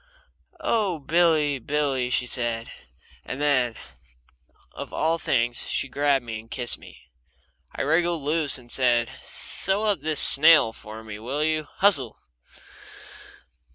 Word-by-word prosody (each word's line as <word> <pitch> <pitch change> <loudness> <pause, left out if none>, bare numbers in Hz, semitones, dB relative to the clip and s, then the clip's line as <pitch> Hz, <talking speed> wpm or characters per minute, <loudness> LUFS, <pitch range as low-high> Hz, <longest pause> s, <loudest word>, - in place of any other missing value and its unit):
"Oh, 205 -7 -1
Billy, 155 -2 +1
Billy!" 135 -1 -2
she 125 - 0
said, 120 -2 -4 0.5
and 130 - -7
then, 130 -5 +1 1.0
of - - -9
all 165 +2 -1
things, 120 -3 -1
she - - -1
grabbed 140 -1 0
me 110 -2 -6
and 115 +1 -16
kissed 120 -1 0
me. - - -16 0.7
I - - -3
wriggled 165 +1 0
loose, 150 -1 +1
and 125 -2 -16
I - - +3
said: 120 -3 +2
"Sew 195 +3 0
up 205 -8 0
this 155 -1 -2
sail 155 -6 +7
for 110 0 -11
me, 105 -1 -9
will 135 +7 -3
you? 155 -1 -1
Hustle!" 140 - +2
140 Hz, 135 wpm, -24 LUFS, 120-160 Hz, 1.0 s, sail